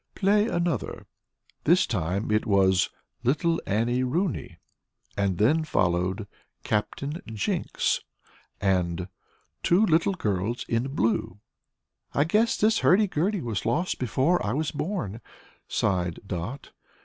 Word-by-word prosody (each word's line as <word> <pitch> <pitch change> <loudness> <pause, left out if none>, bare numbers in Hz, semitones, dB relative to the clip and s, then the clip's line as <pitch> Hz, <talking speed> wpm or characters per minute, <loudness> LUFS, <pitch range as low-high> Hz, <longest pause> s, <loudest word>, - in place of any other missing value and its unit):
"Play 205 +2 +3
another." 170 - -2 0.6
This 175 +4 +5
time 95 -2 -1
the 105 0 +3
tune 110 - -8
was 95 -2 +4 0.3
"Little 155 +7 +1
Annie 115 +5 +1
Rooney," 130 - -1 0.6
and 100 -3 0
then 150 +10 +3
followed 90 - 0 0.4
"Captain 140 +9 -2
Jinks" 110 -3 -1 0.6
and 90 -2 0 0.5
"Two 185 +6 +4
Little 170 +2 +2
Girls 105 - -1
in 125 +4 -1
Blue." 110 -5 0 0.8
"I 140 - +4
guess 215 +8 +2
this 220 +1 +3
hurdy 205 +4 +5
gurdy 190 +2 0
was 110 -5 -3
lost 165 +11 0
before 130 +8 +1
I 105 +2 -1
was 155 +3 -1
born," 145 - -3 0.5
sighed 90 -3 0
Dot. 95 +9 -5
120 Hz, 120 wpm, -26 LUFS, -, 0.8 s, This